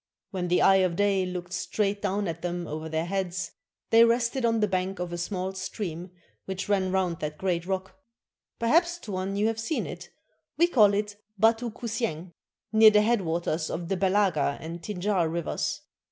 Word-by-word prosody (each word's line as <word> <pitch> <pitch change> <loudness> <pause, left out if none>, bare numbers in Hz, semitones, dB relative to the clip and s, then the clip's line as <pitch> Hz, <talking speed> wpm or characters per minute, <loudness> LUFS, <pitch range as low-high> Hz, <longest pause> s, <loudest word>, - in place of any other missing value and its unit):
When 185 -3 -2
the 175 +1 +3
eye 195 - +6
of 185 -3 +2
day 195 -1 +2
looked 180 0 -6
straight 200 +1 -1
down 200 0 -1
at 165 0 -4
them 175 0 -3
over 155 +1 -5
their 160 +1 -1
heads, 185 0 -2 0.4
they 230 0 +8
rested 235 +2 +2
on 230 -1 +2
the 210 - +2
bank 190 0 -1
of 180 -1 -4
a - - -3
small 185 +1 -3
stream 185 -2 -5 0.4
which 190 -1 -4
ran 190 -2 +1
round 185 -3 0
that 150 0 -4
great 175 -1 -1
rock 190 +5 -4 0.6
(perhaps, 340 +9 +2
Tuan, 195 - -4
you 205 +1 +1
have 225 0 0
seen 260 +8 -1
it) - - -8 0.2
— - - -50
we 340 - +6
call 215 - +5
it 205 0 -2 0.2
'Batu 225 +3 +3
Kusieng,' 220 -7 -4 0.2
— - - -63
near 220 0 +9
the 210 0 +4
head 230 -1 +2
waters 165 -1 -1
of 170 0 -4
the 195 - +1
Belaga 185 -7 +2
and 165 +1 -7
Tinjar 190 -3 0
Rivers. 170 -1 -2
190 Hz, 190 wpm, -27 LUFS, 175-210 Hz, 0.6 s, near